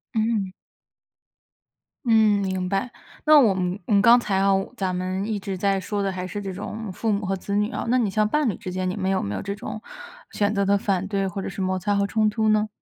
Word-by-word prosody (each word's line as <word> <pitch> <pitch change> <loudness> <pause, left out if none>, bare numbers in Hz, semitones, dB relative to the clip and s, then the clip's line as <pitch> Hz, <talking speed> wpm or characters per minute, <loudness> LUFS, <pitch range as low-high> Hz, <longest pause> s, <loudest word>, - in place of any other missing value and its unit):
嗯。 215 -4 0 1.5
嗯， 220 -3 +4
明 185 -1 -2
白， 195 +6 -1 0.3
那 305 -1 +7
我 220 -7 +5
们 185 +1 -2
我 215 - 0
们 200 - +5
刚 235 +3 +7
才 205 -4 -2
啊， 195 +1 +3 0.2
咱 190 -5 -2
们 185 +2 -2
一 215 -2 -2
直 195 -1 -4
在 195 +1 +1
说 200 +2 -3
的 195 - 0
还 185 0 -5
是 205 +3 -5
这 195 -2 -5
种 210 +2 -6
父 220 +5 -3
母 200 0 -2
和 195 - -1
子 200 +2 -3
女 210 +2 +1
啊， - - -4
那 250 +2 +3
你 225 -5 +1
像 215 +2 +1
伴 295 +3 +1
侣 200 - -3
之 180 - -7
间， 185 0 -1
你 185 - -4
们 190 -1 -1
有 190 - +1
没 100 +1 -3
有 - - -3
这 200 0 -4
种 210 +1 -7 0.5
选 205 0 0
择 200 -1 +1
的 200 +1 +3
反 195 -1 -1
对 200 -1 -1
或 195 +1 -4
者 - - -5
是 195 0 -5
摩 185 0 0
擦 205 +3 0
和 200 0 +2
冲 215 +1 +1
突 220 0 0
呢？ 215 0 +3
200 Hz, 265 characters per minute, -24 LUFS, 190-215 Hz, 1.5 s, 那